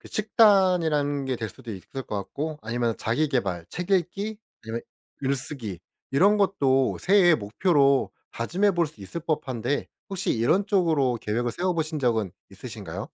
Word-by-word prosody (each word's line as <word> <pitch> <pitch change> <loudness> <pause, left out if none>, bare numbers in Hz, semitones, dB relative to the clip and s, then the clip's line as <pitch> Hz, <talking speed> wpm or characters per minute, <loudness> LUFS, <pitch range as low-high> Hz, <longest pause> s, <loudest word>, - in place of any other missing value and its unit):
그 - - -13
식단이라는 180 -10 +3
게 130 -1 -1
될 115 -2 -4
수도 110 +3 -9
있을 105 +7 -7
것 105 - -5
같고 150 +10 -4
아니면 115 +1 -1
자기 145 +7 0
계발 95 - -1
책 180 +2 -6
읽기 195 +4 0 0.2
그런 115 +1 -4 0.4
글쓰기 130 - -3 0.3
이런 195 +10 +4
것도 140 -10 +2
새해 185 -3 +5
목표로 140 - +2 0.2
다짐해볼 175 - +1
수 145 -8 -15
있을 100 - -6
법한데 140 -5 -2 0.2
혹시 190 -1 -2
이런 150 - +2
쪽으로 155 - +2
계획을 120 +3 -1
세워보신 165 -1 -1
적은 115 -7 +1 0.2
있으신가요? - - -7
145 Hz, 320 characters per minute, -26 LUFS, 120-180 Hz, 0.4 s, 새해